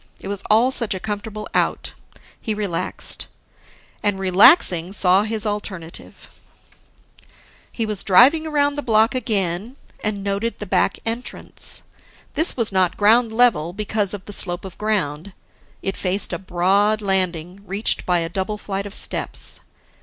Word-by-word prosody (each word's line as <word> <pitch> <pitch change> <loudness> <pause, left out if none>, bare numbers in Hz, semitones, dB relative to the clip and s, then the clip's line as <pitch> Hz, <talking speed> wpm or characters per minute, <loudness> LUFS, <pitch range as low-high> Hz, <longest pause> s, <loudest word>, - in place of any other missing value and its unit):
It - - -8
was 200 -1 -3
all 230 +5 +4
such 230 -6 +1
a - - -4
comfortable 210 +1 -5
Out, - - -1 0.5
he 220 - -2
relaxed. 200 -5 -3 0.7
And, 205 -2 0
relaxing, 190 - +4
saw 185 -1 +4
his 220 0 0
alternative. 190 -5 -7 1.3
He 230 - -2
was 210 -2 -2
driving 270 - +5
around 290 -2 +1
the - - -1
block 225 -2 +3
again, 210 -2 -1 0.3
and 205 -2 -2
noted 200 +4 -2
the 210 - -6
back 195 - +1
entrance. 230 +2 -4 0.5
This 320 -2 +2
was 230 -4 0
not 185 -2 +1
ground 225 +3 +4
level, 220 -9 +2
because 210 0 -1
of 200 - -11
the 205 - -4
slope 175 -1 +2
of 190 - -9
ground; 190 -4 -2 0.5
it 195 - -2
faced 190 0 0
a 170 - -3
broad 195 +4 +1
landing, 185 -2 -1
reached 200 +4 +1
by 175 -1 +1
a 165 - -2
double 190 +4 -3
flight 200 -1 -4
of 200 - -10
steps. - - -3
205 Hz, 145 wpm, -21 LUFS, 185-220 Hz, 1.3 s, driving